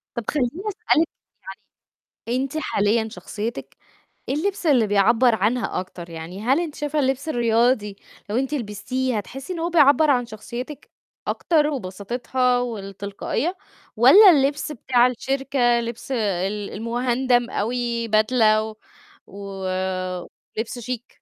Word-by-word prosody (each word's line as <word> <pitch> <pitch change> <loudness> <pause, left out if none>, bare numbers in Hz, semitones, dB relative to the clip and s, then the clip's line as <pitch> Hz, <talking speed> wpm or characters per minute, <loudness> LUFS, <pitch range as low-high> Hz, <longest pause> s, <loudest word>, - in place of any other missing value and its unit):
طَب 235 - -3
خلّيني 255 -5 +1 0.2
أسألِك 395 -6 +1 1.2
يعني، 250 +3 0
أنتِ 275 +3 -4
حاليًا 220 -4 +1
شخصيتِك 220 0 -6 0.5
إيه 270 - 0
اللبس 385 +4 -2
اللي 255 -8 +4
بيعبّر 220 +4 +4
عنها 220 +3 0
أكتر؟ 180 -2 -8
يعني 165 +4 -8
هل 260 +7 +2
أنتِ 320 -4 -5
شايفة 295 0 -2
اللبس 270 +2 0
الرياضي 230 -4 +1 0.3
لو 215 - -1
أنتِ 270 +3 -1
لبستيه 250 +1 -2
هتحسي 270 - -6
إن 335 - -5
هو 335 +1 -1
بيعبّر 305 -2 +5
عن 245 -2 +2
شخصيتِك 240 +6 -8 0.4
أكتر 305 -3 +2
وبساطتها 245 +2 -1
والتلقائية، 215 - -3 0.4
والّا 330 - +9
اللبس 285 0 +1
بتاع 250 -2 +3
الشركة، 260 -1 0
لبس 235 +2 -6
ال 205 -3 -1
المُهندم 245 +2 0
أوي 235 +1 -2
بدلة 215 0 +3
و 220 0 -7 0.5
ولِبس 190 +3 -5
شيك؟ 245 0 -7
240 Hz, 120 wpm, -23 LUFS, 210-270 Hz, 1.2 s, والّا